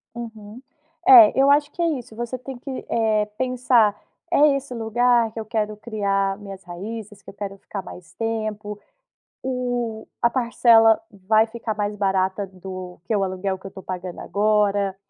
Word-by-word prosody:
Uhum. 225 -1 -9 0.5
É, 360 -8 +9
eu 275 +1 +5
acho 290 +1 +3
que 350 - -5
é - - +3
isso, 225 -2 -13
você 240 +2 -4
tem 255 +1 -8
que, 265 0 -7
eh, 220 -2 +2
pensar 250 -4 +2 0.4
"É 295 -3 +5
esse 275 -1 -5
lugar 235 0 +2
que 225 - -6
eu 220 - -5
quero 215 -1 -2
criar 200 -3 -1
minhas 195 -2 -10
raízes, 205 +4 -8
que - - -13
eu - - -11
quero 200 -1 -6
ficar 195 0 -7
mais 180 -2 -12
tempo? 215 -2 -3 0.6
O 245 -3 -3
a 235 - +4
parcela 235 -2 +4
vai 215 +2 +2
ficar 225 -1 -5
mais 205 0 -2
barata 195 0 0
do 185 -1 -9
que 220 - 0
o 200 - +1
aluguel 190 0 -2
que 190 - -9
eu - - -10
tô 190 - -11
pagando 180 -1 -6
agora? 205 -2 +1
215 Hz, 170 wpm, -23 LUFS, 195-235 Hz, 0.6 s, É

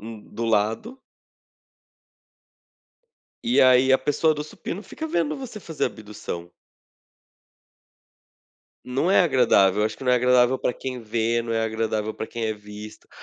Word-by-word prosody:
hum, 110 0 -9
do 115 - -3
lado 115 - 0 2.5
e 240 - +4
aí 130 +1 +6
a 130 - +5
pessoa 150 +3 +2
do 150 0 -4
supino 170 +5 -7
fica 320 - -7
vendo 165 - -1
você 235 -5 -8
fazer 160 -5 -3
abdução. 105 -5 -6 2.4
Não 135 +8 0
é 190 - +6
agradável, 115 - +4
eu 105 - +3
acho 110 - -6
que 135 - -10
não 125 - +3
é - - +6
agradável 125 +1 +3
pra - - 0
quem 125 0 -6
vê, 115 +1 0
não 115 -1 -3
é 115 - +1
agradável 110 -1 -2
pra 110 - -6
quem 115 -1 -5
é 110 - 0
visto. 105 0 -11
120 Hz, 150 wpm, -24 LUFS, 110-140 Hz, 2.5 s, aí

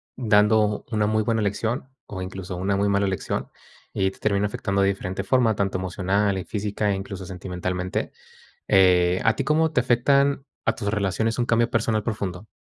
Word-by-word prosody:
dando 105 -2 +3
una 105 -1 +1
muy 110 0 +1
buena 115 0 0
lección 110 +5 -2 0.2
o, 95 -2 -7
incluso, 95 0 -6
una 95 +2 0
muy 100 +1 +1
mala 100 0 +2
lección, 95 -4 -3 0.5
y 95 0 +1
te - - -19
termina 100 -1 +1
afectando 100 -1 -1
de 100 - +4
diferente 95 0 -3
forma, 115 0 +2
tanto 95 -1 -1
emocional, 95 +2 0
y 95 - -3
física, 105 0 -2
e - - +1
incluso 95 -1 -6
sentimentalmente, 90 0 -4 0.6
eh, 90 -1 +4
¿a 115 - +2
ti 140 - -1
cómo 155 +2 +2
te 150 -5 +1
afectan 140 +3 +2 0.2
a - - +2
tus 105 - -4
relaciones 105 +2 0
un 120 - +2
cambio 115 0 +2
personal 115 -2 +1
profundo? 100 -3 -4
100 Hz, 180 wpm, -24 LUFS, 95-110 Hz, 0.6 s, de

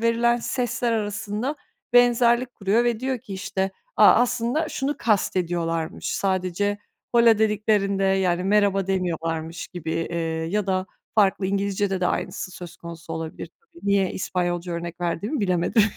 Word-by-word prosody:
verilen 230 +1 +3
sesler 245 0 -1
arasında 215 +5 -2 0.4
benzerlik 245 0 +4
kuruyor 205 +4 +2
ve 235 -2 0
diyor 260 0 -1
ki, 215 -5 -8
işte, 190 0 -2 0.3
"A, - - +7
aslında 250 +6 +1
şunu 280 +1 -2
kastediyorlarmış. 170 -6 0
Sadece 190 +1 0 0.4
hola 235 -2 +6
dediklerinde, 210 -2 +1
yani, 185 -2 +2
merhaba 200 -1 +2
demiyorlarmış." 165 -3 -2
gibi, 170 -3 -6
eee, 170 +1 -2 0.3
ya 210 +1 0
da 185 -1 0 0.3
farklı 195 -2 +3
İngilizcede 200 0 0
de 180 - +2
aynısı 185 - -3
söz 180 -1 -10
konusu 170 -1 -9
olabilir 160 -1 -5
tabii. 355 - -14
Niye 200 -2 +2
İspanyolca 175 -1 -2
örnek 170 +1 -5
verdiğimi 175 - -2
bilemedim. 185 +2 +2
195 Hz, 135 wpm, -24 LUFS, 180-230 Hz, 0.4 s, A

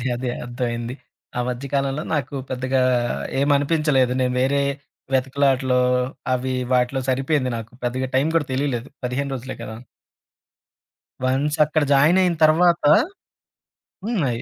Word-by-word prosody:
అదే. 125 - -4
అదే. 125 0 -3
అర్థమయింది. 120 0 -3 0.4
ఆ - - +1
మధ్య 125 +2 -4
కాలంలో 140 +2 0
నాకు 145 -2 -2 0.2
పెద్దగా 130 +1 0 0.6
ఏమనిపించలేదు. 145 -2 +2
నేను 125 -1 +1
వేరే 140 +2 +2 0.5
వెతుకులాటలో 130 -1 +2 0.5
అవీ 130 +1 -2 0.2
వాటిలో 125 +2 +1
సరిపోయింది 135 0 +1
నాకు, 115 +1 -9
పెద్దగా 130 +2 -1
టైం 140 +4 +2
కూడా 155 -4 +1
తెలీలేదు. 130 -2 -1 0.2
15 135 +3 -2
రోజులే 130 0 -6
కదా! 110 -1 -7 1.5
వన్స్ 140 +4 0
అక్కడ 155 +1 0
జాయినయిన 170 +6 +4
తర్వాత 170 +2 +3 1.2
హ్మ్. 225 -4 0
అయి 120 -1 -3
130 Hz, 120 wpm, -22 LUFS, 125-145 Hz, 1.5 s, జాయినయిన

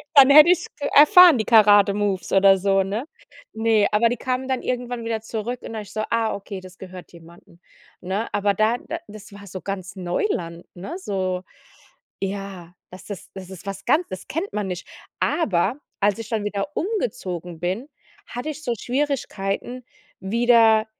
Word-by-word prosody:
Dann 275 -1 +9
hätte 300 +3 +9
ich's 355 -1 +2
k 285 - -3
erfahren, 340 +1 +8
die 220 - -1
Karate-Moves 205 -3 +4
oder 195 0 +6
so, 195 0 +2
ne? 205 +7 -4 0.5
Ne, 220 -2 +2
aber 220 +2 +3
die 245 - -2
kamen 255 +2 -3
dann 260 -2 -1
irgendwann 245 -1 -3
wieder 225 -1 -2
zurück 225 +2 -5
und - - -8
da 220 - -4
ich 205 - -12
so: 215 - -3
„Ah, 230 -1 0
okay, 200 -1 -7
das 185 -1 -14
gehört 185 -1 -11
jemanden“, 170 0 -17 0.4
ne? 195 +5 -3
Aber 205 0 +1
da 215 +4 +2
da 325 +6 -6
das 210 -1 -12
war 200 0 -12
so 185 0 -8
ganz 195 +1 -6
Neuland, 175 - -3
ne, 195 - -7
so, 185 - -3 0.8
ja, 195 -3 -6 0.2
dass 185 - -12
das 205 -4 -8
das 190 -1 -9
ist 190 0 -11
was 195 -1 -6
ganz 310 +8 +2
das 185 - -8
kennt 340 +7 -3
man 210 -1 -2
nicht. 180 -1 -6 0.3
Aber, 210 - +1 0.2
als 205 +1 +2
ich 225 -1 -7
dann 220 -3 -2
wieder 205 +3 -2
umgezogen 185 - -3
bin, 190 +10 -3 0.4
hatte 245 +6 -5
ich 310 0 -8
so 240 -5 -1
Schwierigkeiten, 250 -3 -3 0.4
wieder, 225 +1 +4
210 Hz, 175 wpm, -22 LUFS, 190-245 Hz, 0.8 s, Dann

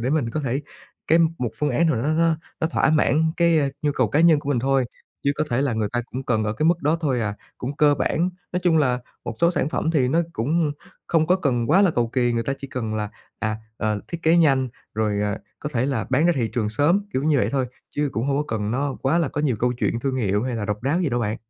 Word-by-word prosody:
để 125 +3 -1
mình 145 -7 +1
có 155 - -2
thể 135 +1 -1 0.5
cái 165 +2 +4 0.2
một 120 -3 -1
phương 150 -1 +1
án 160 +7 +2
nào 160 - +2
đó 115 - -2
nó 150 +4 +1
nó 165 0 +3 0.2
nó 160 - +2
thỏa 160 - +2
mãn 155 +1 +2
cái, 170 -2 +4
a, 140 -2 +2
nhu 145 -1 +1
cầu 130 -5 +1
cá 145 - +2
nhân 165 -2 +6
của 140 - -7
mình 135 - +2
thôi, 135 +1 +2 0.4
chứ 140 - +3
có 155 - 0
thể 125 +3 +1
là 140 -4 0
người 110 -2 -1
ta 120 - 0
cũng 130 +1 -4
cần 110 -3 +1
ở 105 - 0
cái 155 +7 0
mức 170 +1 +2
đó 155 +3 +2
thôi 135 -6 0
à, 105 -2 -2 0.2
cũng 135 +3 -5
cơ 150 -1 +5
bản. 165 +6 0 0.2
Nói 180 - 0
chung 165 -3 +4
là 125 -4 +2 0.3
một 115 - -4
số 170 - +5
sản 160 -4 0
phẩm 160 0 -1
thì 135 -6 +2
nó 165 +6 +3
cũng 150 +4 0 0.3
không 160 -2 +2
có 180 +3 +4
cần 125 -9 0
quá 195 - +6
là 190 - +4
cầu 120 -5 0
kì, 120 0 +1
người 115 0 0
ta 135 - -2
chỉ 140 - -8
cần 110 -4 -3
là, 105 -1 -2 0.3
à, 110 0 -1 0.2
ờ, 105 -2 -1
thiết 170 -1 -6
kế 165 +2 +4
nhanh 135 -6 +3 0.3
rồi, 105 -1 0
à, 105 -1 -1 0.2
có 150 - -4
thể 125 +2 +1
là 115 -8 -1
bán 145 +5 +3
ra 175 - +4
thị 115 -3 0
trường 110 -3 0
sớm, 145 - +2
kiểu 130 - 0
như 150 -1 +3
vậy - - +1
thôi, 130 -2 +1 0.3
chứ 145 0 0
cũng 115 +4 -2
hông 140 0 +1
có 150 - 0
cần 105 0 -2
nó 135 +3 -1
quá 145 +6 +2
là 160 -5 +1
có 145 - -3
nhiều 130 -7 +1
câu 125 +2 +1
chuyện 120 -1 -1
thương 130 0 -1
hiệu 105 -3 +1
hay 125 -2 -2
là 105 - -3
độc 105 +1 -3
đáo 145 +7 +1
gì 175 - +1
đâu 120 -2 -1
bạn. 110 -1 -1
135 Hz, 290 wpm, -23 LUFS, 120-155 Hz, 0.5 s, nhân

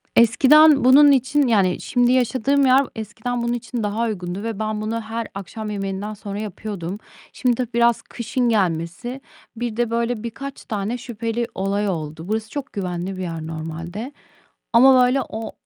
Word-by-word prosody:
Eskiden 280 +5 +6
bunun 280 +3 +7
için 275 +1 +2
Yani, 195 -6 +2
şimdi 245 -1 +2
yaşadığım 260 +2 +2
yer 260 +1 +6
eskiden 225 +3 -4
bunun 235 0 0
için 240 -1 -4
daha 210 +3 -1
uygundu 190 -3 -4
ve 225 -2 -4
ben 215 -1 -2
bunu 225 +2 -2
her 225 +1 -4
akşam 210 +2 -6
yemeğinden 200 0 -4
sonra 200 -1 -6
yapıyordum. 200 -3 -5 0.4
Şimdi 250 -2 +1
tabii 245 -1 -4
biraz 235 -1 +3
kışın 240 +1 -2
gelmesi 190 +5 -1 0.3
Bir 230 -1 -4
de 240 -1 +1
böyle 230 -1 -1
birkaç 270 +4 -7
tane 210 +3 -3
şüpheli 230 0 -3
olay 200 +1 -1
oldu. 160 -1 -5
Burası 220 +1 -2
çok 285 0 -6
güvenli 185 -1 -4
bir - - -5
yer 165 -3 -5
normalde 165 - -6 0.6
ama 255 +2 +7
böyle 260 +2 +2
o 220 +1 -6
225 Hz, 160 wpm, -22 LUFS, 195-245 Hz, 0.6 s, bunun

